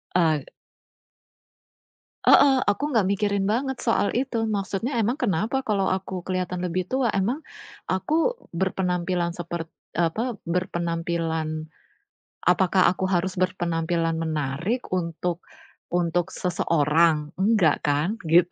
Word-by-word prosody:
Eee. 160 -5 +3 1.8
Heeh, 275 -2 +7
aku 205 +9 0
ga 225 -8 +2
mikirin 200 0 +1
banget 255 +5 0
soal 205 -3 +3
itu. 230 -4 -1
Maksudnya 205 +5 -2
emang 230 +2 +2
kenapa 235 - 0
kalo 205 -6 0
aku 190 -1 -4
keliatan 185 -1 -2
lebih 180 +1 -2
tua? 260 -3 +1
Emang, 235 +11 -1 0.4
aku 315 - +1 0.2
berpenampilan 180 -1 -1
sepert 170 -2 -5 0.2
apa, 195 +9 0
berpenampilan 165 -2 -2 0.8
apakah 185 +1 +4
aku 185 +1 -4
harus 180 +2 0
berpenampilan 170 -2 0
menarik 160 - -1 0.2
untuk 170 0 -2 0.5
untuk 175 +1 0
seseorang? 160 -2 +1
Enggak 190 -5 +3
kan? 150 +8 +1
Gitu. 175 +2 +4
180 Hz, 105 wpm, -25 LUFS, 165-205 Hz, 1.8 s, Heeh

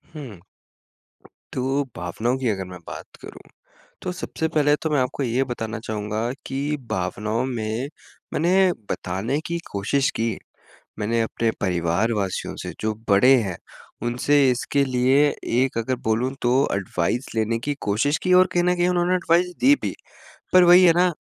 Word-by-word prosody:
हुँ। 125 - -8 1.1
तो 135 +2 0
भावनाओं 110 +9 -1
की 130 - -2
अगर 95 -3 -2
मैं 90 -1 -10
बात - - -9
करूँ, - - -11 0.6
तो 180 - -3
सबसे 160 -2 -3
पहले 150 -2 +3
तो 160 +1 -3
मैं 145 -3 +2
आपको 130 +2 -2
ये 125 +2 +1
बताना 115 -3 -4
चाहूँगा 110 +1 -3
कि 140 +3 -2
भावनाओं 105 +6 -1
में 115 +1 -3 0.5
मैंने 185 +3 +3 0.2
बताने 105 +11 -2
की 170 0 -2
कोशिश 110 +8 +1
की। 115 0 0 0.6
मैंने 115 +2 0
अपने 115 0 -1
परिवारवासियों 95 +3 -1
से, - - -5
जो 110 0 -1
बड़े 115 +7 +6
हैं, 95 -4 -4 0.5
उनसे 125 +5 +1
इसके 140 +3 0
लिए 130 +3 +3 0.2
एक 125 +1 +1
अगर 125 +3 -1
बोलूँ 115 +4 +1
तो 120 0 +2 0.2
एडवाइज़ 100 +5 -1
लेने 110 +1 0
की 145 +5 -3
कोशिश 115 +9 +1
की, 185 - +1
और 185 0 +7
कहीं 175 - +2
न 180 0 +3
कहीं 175 0 +2
उन्होंने 180 0 +2
एडवाइज़ 180 0 +2
दी 280 +2 +6
भी। - - -2 0.6
पर 185 0 +7
वही 180 +1 +8
है 170 - +7
ना 180 0 +4
125 Hz, 160 wpm, -23 LUFS, 110-150 Hz, 1.1 s, वही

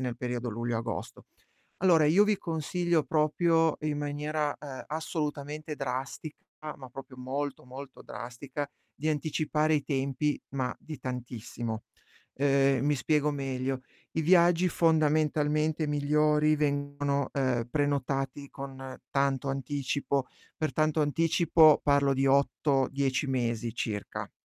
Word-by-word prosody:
nel 125 -2 -2
periodo 125 0 -3
luglio, 115 +1 -2
agosto. 115 +1 -5 0.5
Allora 170 -4 +5
io 170 +7 +6
vi 210 -2 +1
consiglio 170 0 0
proprio 160 +2 +2
in 150 -1 -1
maniera, 150 +1 -2
ehm, 135 -3 -8
assolutamente 150 -1 -4
drastica 135 +3 -4 0.4
ma 130 -2 -10
proprio 130 +1 -10
molto, 135 +2 -4
molto 130 +1 -10
drastica, 125 +6 -6 0.3
di 155 +3 -3
anticipare 155 +1 +1
i 150 - +1
tempi, 140 +1 -1
ma 130 -2 -2
di 155 -2 -8
tantissimo. 120 -3 -5 0.5
Uhm, 140 -1 +3
mi 150 - +3
spiego 150 +3 +1
meglio: 135 -2 -2 0.3
i 160 - 0
viaggi 175 +1 +5
fondamentalmente 155 -1 +2
migliori 150 +1 +3
vengono, 145 -1 0
uhm, 130 -4 0
prenotati 140 -1 -1
con 135 -1 -8
tanto 140 -1 +1
anticipo, 140 0 -1 0.3
per 155 - -1
tanto 155 0 +2
anticipo, 160 +1 +5
parlo 140 -1 +3
di 135 +1 +1
8-10 135 0 +2
mesi 120 -3 -1
circa. 105 -4 -4
145 Hz, 120 wpm, -29 LUFS, 130-155 Hz, 0.5 s, io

